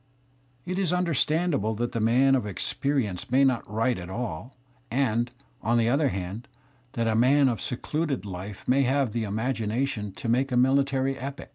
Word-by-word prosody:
It 185 +1 -2
is 185 -4 +1
understandable 160 - +1
that 120 +2 -2
the 115 - -2
man 125 +5 +4
of 125 -5 +1
experience 110 +1 -2
may 130 +3 +4
not 130 -7 +1
write 115 +1 0
at 90 0 -8
all, 115 +2 -5 0.3
and, 120 -2 +1 0.3
on 115 +2 +2
the 115 0 +3
other 140 +3 +3
hand, 95 +6 -5 0.5
that 115 - -1
the 115 -1 +1
man 135 +5 +4
of 120 -4 -1
secluded 140 - -2
life 95 +1 -7
may 135 +2 +4
have 135 -2 +1
the 115 -2 -1
imagination 110 0 -2
to 120 - -6
make 130 +4 +1
a 125 - +1
military 135 +1 +2
epic. 140 +2 -6
125 Hz, 170 wpm, -26 LUFS, 110-135 Hz, 0.5 s, man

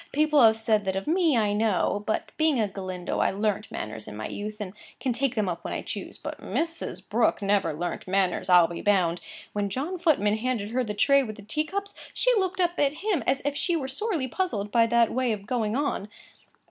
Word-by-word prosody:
People 305 0 +3
have 220 -2 +7
said 220 -2 +1
that 190 0 -1
of 195 - -2
me, 325 -4 +3
I 210 -2 +2
know. 205 -1 +1
But, 220 - -1
being 315 -5 +2
a 215 - +2
Galindo, 185 -2 -4
I - - +3
learnt 210 +1 -1
manners 110 0 -6
in 105 - -8
my 110 - -4
youth 210 +1 -6
and 195 -3 -5 0.3
can 255 - 0
take 255 +1 0
them 215 -3 +1
up 175 -2 -3
when - - -4
I - - -4
choose. - - -6
But - - -7
Mrs. 330 0 -3
Brooke - - +2
never 200 -4 +2
learnt 175 +5 -4
manners, 190 0 0
I'll 180 -2 +8
be 170 0 -6
bound. 180 -4 +2 0.3
When 205 -1 -1
John 300 - -3
Footman 245 - +2
handed 225 -3 -2
her 255 +1 +1
the 210 -3 -4
tray 275 +6 +5
with 215 -5 -5
the 205 - -12
tea 305 +9 -1
cups, 400 +4 -4 0.2
she - - +3
looked 375 -2 0
up 350 -1 +1
at 285 -1 +3
him 415 -6 +1
as 270 - +1
if 285 0 0
she 345 +3 0
were 280 -5 -2
sorely 300 - -2
puzzled 230 - -2
by 230 -1 +4
that 235 -1 +3
way 255 -2 +1
of 200 -2 -6
going 220 -2 -1
on. 270 -7 -1
225 Hz, 225 wpm, -26 LUFS, 200-290 Hz, 0.3 s, I'll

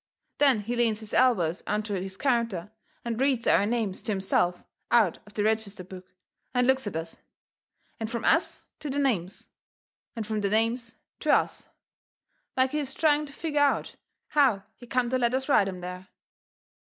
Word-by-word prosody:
Then 270 -7 +5
he 235 +4 -3
leans 225 -2 +1
his 220 - -7
elbows 185 -10 +3
onto 210 0 -1
his 190 0 -4
counter 230 -8 0 0.3
and 235 +1 -2
reads 265 -4 +2
our 200 - +4
names 220 -5 -1
to - - -2
himself 190 -2 +1 0.3
out 220 -8 +3
of 210 - -16
the 205 - 0
register 215 -3 -1
book, 185 0 -11 0.5
and 250 0 +3
looks 265 -2 +2
at 200 - -4
us, 165 0 -4 0.8
and 220 -1 -3
from 235 0 -3
us 330 - +2
to 300 - -5
the 275 - -2
names, 205 -10 -1 0.7
and 225 -2 -4
from 215 0 -2
the 200 - 0
names 230 +2 0 0.2
to - - +1
us, - - +1 0.9
like 260 0 +3
he 300 - -1
is 270 -2 -4
trying 300 -1 +2
to 275 - -12
figger 300 -1 -2
out 290 -1 +1 0.3
how 260 -10 +3
he 245 - -14
come 250 -1 0
to 255 - +1
let 240 0 +2
us 265 0 -2
write 205 -9 +4
'em 185 -2 -5
there. 180 +1 -7
225 Hz, 180 wpm, -27 LUFS, 195-260 Hz, 0.9 s, Then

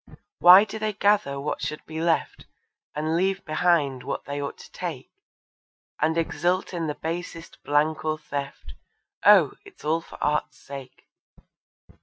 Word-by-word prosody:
Why 180 +3 +9
do 215 +1 -6
they 215 0 -1
gather 200 -9 +2
what 145 +2 -3
should 150 - -4
be 160 0 -5
left, 165 -1 -1 0.5
And 155 +2 -1
leave 190 +2 0
behind 155 -5 +1
what - - -5
they 145 +1 -4
ought 140 - -5
to - - -14
take, - - -6 0.9
And 160 +2 +2
exult 175 +3 0
in 170 -2 -2
the 150 - -3
basest 165 0 -6
blank 150 +2 +1
or 155 0 -1
theft? 140 -2 -6 0.5
Oh, - - +7
it's 405 - -16
all 160 +2 +1
for - - -13
Art's 150 0 -1
sake. 135 -2 -11
160 Hz, 150 wpm, -25 LUFS, 150-175 Hz, 0.9 s, Why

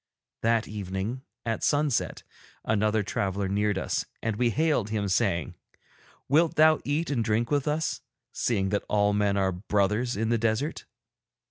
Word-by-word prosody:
That 115 0 +2
evening, 100 +4 -4 0.2
at 115 -1 -2
sunset, 145 -3 +1 0.4
another 110 0 +1
traveller 100 0 -1
neared 105 +1 0
us, - - -1 0.2
and 110 -1 -2
we 120 +2 +2
hailed 150 -5 +1
him, 105 -2 -1
saying: 95 - 0 0.7
'Wilt 160 +4 +3
thou 155 0 +5
eat 150 +3 -1
and 120 -5 +1
drink 110 +3 0
with 145 0 +1
us, 155 +2 -1 0.3
seeing 100 -5 0
that 100 +1 0
all 105 0 +3
men 100 -1 +1
are 95 -1 +2
brothers 105 +5 0
in 110 +1 0
the 115 -1 +2
desert?' 115 +7 -1
110 Hz, 150 wpm, -27 LUFS, 100-125 Hz, 0.7 s, thou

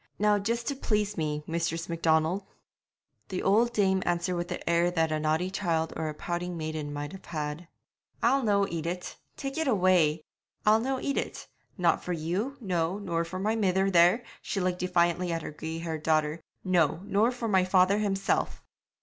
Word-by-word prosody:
'Now 210 0 +3
just 235 +4 -1
to 280 - -1
please 210 -5 0
me, 150 -2 -2
Mistress 165 0 -2
Macdonald.' 165 +2 +1 0.9
The 185 - -3
old 225 +5 +4
dame 190 -4 +2
answered 175 +1 0
with 175 0 -2
the 180 - -6
air 170 +1 +3
that 165 -2 +1
a 155 - 0
naughty 155 +4 0
child 165 -5 -1
or 160 - -2
a - - -4
pouting 175 +2 -3
maiden 155 -2 -4
might 145 0 -4
have 190 - -11
had. 155 +1 -4 0.6
'I'll 270 +4 +4
no 200 -4 +2
eat 165 -1 -4
it 180 +1 -4 0.2
tak' 275 +3 -4
it 320 - 0
away! 180 - +3 0.4
I'll 215 +1 +6
no 260 +3 -1
eat 280 +1 -2
it. - - -5 0.3
Not 175 -3 +2
for 180 - -2
you, 180 - -2
no 180 -4 -1
nor 170 -5 -1
for 170 +2 -6
my 210 +4 0
mither 195 -2 +2
there' 180 +7 +5 0.2
she 195 - -3
looked 180 -1 0
defiantly 180 0 +1
at 165 -1 -2
her - - -5
grey 160 +2 -5
haired 165 -2 -4
daughter 155 0 +1 0.2
'no, 170 -3 +2
nor 210 +4 +2
for 245 -2 -4
my 190 -3 +4
father 185 +2 +4
himself!' 195 -2 0
180 Hz, 185 wpm, -28 LUFS, 165-200 Hz, 0.9 s, I'll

